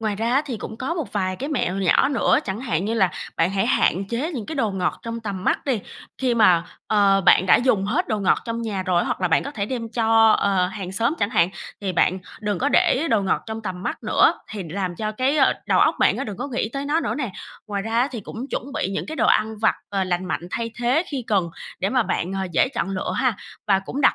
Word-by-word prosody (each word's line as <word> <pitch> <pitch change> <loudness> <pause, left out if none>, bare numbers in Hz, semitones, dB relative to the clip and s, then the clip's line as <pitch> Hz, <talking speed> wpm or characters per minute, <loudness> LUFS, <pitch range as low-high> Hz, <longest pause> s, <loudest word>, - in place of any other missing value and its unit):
Ngoài 215 -2 -1
ra 230 +2 -1
á 275 +3 +3
thì 245 -5 -3
cũng 220 +1 -7
có 270 +8 -3
một 320 -6 -4
vài 185 -2 -1
cái 275 +3 -4
mẹo 195 - -1
nhỏ 195 +8 +3
nữa, 270 - +3
chẳng 195 +4 -4
hạn 205 -8 -1
như 225 +2 -1
là 190 -5 +3 0.3
bạn 165 +2 +2
hãy 195 0 0
hạn 185 +6 +2
chế 275 +9 -2
những 235 -7 -5
cái 315 - -5
đồ 225 -7 0
ngọt 190 -2 -1
trong 230 0 -5
tầm 200 -4 -5
mắt - - +1
đi. 255 -7 0 0.4
Khi 255 -2 +1
mà, 180 -7 +5 0.2
ờ, 200 -2 +4
bạn 185 0 +5
đã - - +7
dùng 225 -6 +2
hết 300 - 0
đồ 215 - 0
ngọt 190 - +3
trong 230 0 -3
nhà 200 -4 -2
rồi, 180 -1 +1
hoặc - - -2
là 180 - +1
bạn 165 - +3
có 280 - -5
thể 205 -8 -3
đem 235 -3 -4
cho, 225 -1 +4
ờ, 190 -2 +2
hàng 190 -1 -6
xóm 230 +8 +1
chẳng 205 - 0
hạn, 200 -7 +3 0.3
thì 190 -2 -2
bạn 185 +2 +2 0.2
đừng 210 -3 -1
có 285 - +1
để 290 +2 +3
đồ 215 -3 +3
ngọt 190 - 0
trong 220 0 -5
tầm 185 -2 -5
mắt - - -4
nữa, - - +4 0.2
thì 210 -4 -5
làm 180 0 -3
cho 215 0 -3
cái, 260 +6 +1
ờ, 275 - +5
đầu - - +3
óc - - +4
bạn - - +3
á - - -3
đừng 205 -4 -6
có 285 - -4
nghĩ 235 -4 -1
tới 275 0 -3
nó 300 +3 +1
nữa - - -2
nè. 260 -8 -3 0.4
Ngoài 200 -2 -3
ra 225 +2 -1
á 260 - +2
thì 235 -4 -5
cũng 230 +6 -7
chuẩn 275 +3 -4
bị 190 - -1
những 195 - -3
cái 315 - -6
đồ - - +2
ăn 220 0 +2
vặt, 220 - +3
ờ, 195 -2 -1
lành 180 0 -1
mạnh 175 0 -3
thay 230 +2 -3
thế 250 +7 +2
khi 265 -5 -3
cần 190 -5 +1 0.3
để 195 - 0
mà 255 -2 +3
bạn, 185 -3 -2
à, 190 - -1
dễ 215 - +3
chọn 195 - -1
lựa 185 - -2
ha. 255 -5 +1 0.3
Và 195 -2 +4
cũng 245 +8 -5
đặt - - +5
215 Hz, 270 wpm, -23 LUFS, 190-250 Hz, 0.4 s, đã